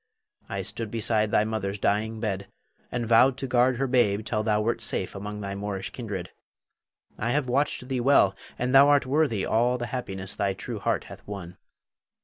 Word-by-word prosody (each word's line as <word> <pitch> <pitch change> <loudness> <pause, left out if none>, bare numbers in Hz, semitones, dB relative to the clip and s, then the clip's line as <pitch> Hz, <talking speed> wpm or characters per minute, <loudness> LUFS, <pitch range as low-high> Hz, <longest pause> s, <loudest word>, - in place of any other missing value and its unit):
I 100 -1 -3
stood 110 +2 -4
beside 110 -1 0
thy 105 - +3
mother's 105 -2 -2
dying 110 +3 0
bed, 100 -3 -3 0.4
and 120 -1 -2
vowed 125 +3 +5
to 135 - -3
guard 125 0 +3
her 135 - 0
babe 110 -5 +2
till 110 -1 0
thou 105 -1 +1
wert 115 +2 0
safe - - -2
among 105 +1 -6
thy 100 -1 -4
Moorish 100 -1 -4
kindred. 100 -7 -5 0.9
I 115 - -1
have 140 +1 +1
watched 125 0 0
thee 130 -1 -1
well, 120 -7 +4 0.2
and 125 +1 -1
thou 140 +1 +8
art 145 -2 +4
worthy 130 -7 +1
all 120 +3 +2
the 120 - -3
happiness 95 -6 -4
thy 100 -1 -1
true - - -6
heart - - 0
hath - - -11
won. 95 -4 -7
110 Hz, 185 wpm, -26 LUFS, 100-125 Hz, 0.9 s, thou